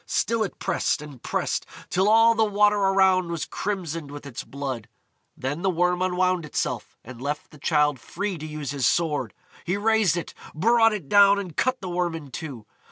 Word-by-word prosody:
Still 230 Hz, -1 st, 0 dB
it 205 Hz, -, -2 dB
pressed 170 Hz, -, 0 dB
and 145 Hz, -5 st, -11 dB
pressed, -, -, -1 dB, 0.3 s
till 190 Hz, +3 st, +3 dB
all 225 Hz, +1 st, +6 dB
the 225 Hz, 0 st, +2 dB
water 210 Hz, 0 st, +3 dB
around 190 Hz, -2 st, +3 dB
was 170 Hz, -2 st, -3 dB
crimsoned 170 Hz, -7 st, -4 dB
with 145 Hz, 0 st, -9 dB
its 140 Hz, -4 st, -6 dB
blood. 135 Hz, -5 st, -5 dB, 0.5 s
Then 145 Hz, +5 st, -3 dB
the 190 Hz, -, +1 dB
Worm 180 Hz, 0 st, +1 dB
unwound 185 Hz, -1 st, +1 dB
itself, 150 Hz, -, -3 dB
and 125 Hz, 0 st, -11 dB
left 145 Hz, +2 st, -4 dB
the 150 Hz, -, -15 dB
Childe 150 Hz, -3 st, +2 dB
free 195 Hz, +6 st, -4 dB
to 155 Hz, -, -6 dB
use 150 Hz, -3 st, -5 dB
his 135 Hz, -5 st, +1 dB
sword. 160 Hz, -4 st, 0 dB, 0.3 s
He 180 Hz, +3 st, -1 dB
raised 215 Hz, -4 st, +2 dB
it, 170 Hz, -, -5 dB, 0.2 s
brought 225 Hz, +6 st, +4 dB
it 200 Hz, -9 st, -5 dB
down, 200 Hz, +2 st, +6 dB
and 185 Hz, -6 st, -5 dB
cut 255 Hz, 0 st, 0 dB
the 185 Hz, -, -5 dB
Worm 175 Hz, -1 st, -1 dB
in 145 Hz, -4 st, -8 dB
two. 130 Hz, -6 st, -7 dB
175 Hz, 190 wpm, -25 LUFS, 150-200 Hz, 0.5 s, all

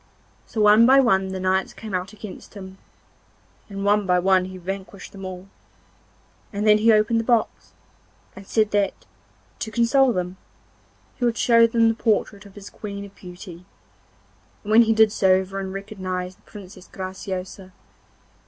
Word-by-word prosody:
So 220 Hz, -, -3 dB
one 210 Hz, +2 st, +6 dB
by 270 Hz, +1 st, +6 dB
one 195 Hz, -7 st, +2 dB
the 190 Hz, 0 st, -5 dB
knights 185 Hz, 0 st, -1 dB
came 215 Hz, -3 st, -9 dB
out 185 Hz, +1 st, -3 dB
against 215 Hz, -1 st, -11 dB
him, 190 Hz, -1 st, -10 dB, 0.9 s
and 195 Hz, 0 st, -5 dB
one 205 Hz, -1 st, +2 dB
by 180 Hz, 0 st, +3 dB
one 185 Hz, 0 st, +2 dB
he 185 Hz, 0 st, -9 dB
vanquished 195 Hz, +2 st, -7 dB
them 195 Hz, -1 st, -10 dB
all, 185 Hz, 0 st, -8 dB, 1.0 s
and 205 Hz, 0 st, -3 dB
then 210 Hz, 0 st, +5 dB
he 225 Hz, +2 st, +4 dB
opened 215 Hz, +1 st, +3 dB
the -, -, -1 dB
box, 230 Hz, -2 st, -1 dB, 0.6 s
and 195 Hz, 0 st, -12 dB
said 215 Hz, -2 st, +1 dB
that, 205 Hz, -1 st, -1 dB, 0.5 s
to 220 Hz, -, -4 dB
console 235 Hz, +4 st, +3 dB
them, 180 Hz, -2 st, -4 dB, 0.8 s
he 245 Hz, -, -1 dB
would 235 Hz, -1 st, 0 dB
show 230 Hz, -1 st, +5 dB
them 230 Hz, 0 st, +2 dB
the 225 Hz, -, +3 dB
portrait 210 Hz, -2 st, -1 dB
of 195 Hz, -, -19 dB
his 205 Hz, -1 st, -11 dB
Queen 200 Hz, -1 st, -7 dB
of 200 Hz, -, -14 dB
Beauty, 180 Hz, -1 st, -12 dB, 1.0 s
and 210 Hz, -, -5 dB
when 225 Hz, +2 st, +7 dB
he 225 Hz, -1 st, +3 dB
did 220 Hz, -1 st, +4 dB
so 190 Hz, -3 st, +3 dB
everyone 190 Hz, 0 st, -2 dB
recognised 185 Hz, -2 st, -6 dB
the -, -, -27 dB
Princess 190 Hz, -2 st, -12 dB
Graciosa. 185 Hz, 0 st, -7 dB
200 Hz, 165 wpm, -23 LUFS, 190-220 Hz, 1.0 s, when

